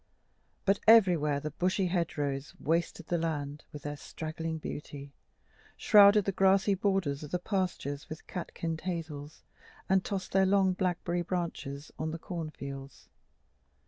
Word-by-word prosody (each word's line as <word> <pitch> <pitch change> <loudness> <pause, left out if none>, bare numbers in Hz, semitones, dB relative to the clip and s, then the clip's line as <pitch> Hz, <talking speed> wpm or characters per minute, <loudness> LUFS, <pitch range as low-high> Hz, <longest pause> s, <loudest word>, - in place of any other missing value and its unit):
But 195 0 +3
everywhere 175 -10 +6
the 150 +1 -5
bushy 185 +5 0
hedgerows 150 -6 -2
wasted 165 +1 -1
the 170 0 0
land 150 -2 -3
with 145 -2 -9
their 145 0 -4
straggling 160 +2 -5
beauty, 145 -2 -7 0.6
shrouded 205 -1 +7
the 195 - +1
grassy 195 +1 +4
borders 190 -7 0
of 150 - -7
the 180 - 0
pastures 180 -7 -3
with 155 - -8
catkined 165 -2 -4
hazels, 155 -5 -5 0.4
and 190 0 +3
tossed 195 -2 -4
their 190 0 +4
long 190 -1 +4
blackberry 175 -1 -1
branches 165 -5 -4
on 155 - -1
the 160 - -4
corn 165 -1 -5
fields. 140 -2 -9
165 Hz, 140 wpm, -30 LUFS, 150-190 Hz, 0.6 s, shrouded